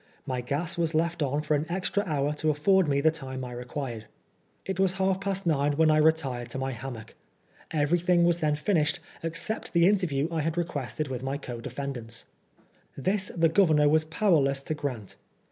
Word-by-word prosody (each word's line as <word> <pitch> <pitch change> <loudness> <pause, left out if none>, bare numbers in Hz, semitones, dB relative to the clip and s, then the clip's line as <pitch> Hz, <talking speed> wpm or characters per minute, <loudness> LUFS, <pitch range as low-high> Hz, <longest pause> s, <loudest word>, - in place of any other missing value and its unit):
My 130 -1 -2
gas 150 +7 -1
was 165 -1 0
left 170 +1 0
on 145 +1 0
for 155 - 0
an 150 +2 0
extra 190 +3 -1
hour 145 -2 0
to 155 +1 0
afford 175 +5 +3
me 140 -1 +2
the 160 +2 +4
time 130 -4 -5
I 125 - -7
required. 125 -2 -5 0.6
It 190 -1 -3
was 190 -1 +3
half 190 0 0
past 195 -1 -2
nine 145 -3 +2
when 155 +1 +4
I 155 - +4
retired 145 -6 +1
to 135 - -2
my 135 0 -2
hammock, 120 -2 -8 0.6
Everything 170 +3 +2
was 170 0 +3
then 150 -2 +1
finished 155 +1 +1 0.2
except 165 +7 -3
the 170 -1 +5
interview 170 -8 +1
I 165 -2 0
had 165 +2 -2
requested 155 -3 -2
with 125 -2 -4
my 135 +2 -2
co 120 -4 -7
defendants. 120 -4 -5 0.7
This 190 +6 +1
the 165 0 +5
Governor 160 -4 +4
was 155 +1 +4
powerless 155 -5 +2
to 155 - -2
grant. 130 -9 -5
155 Hz, 185 wpm, -27 LUFS, 135-170 Hz, 0.7 s, the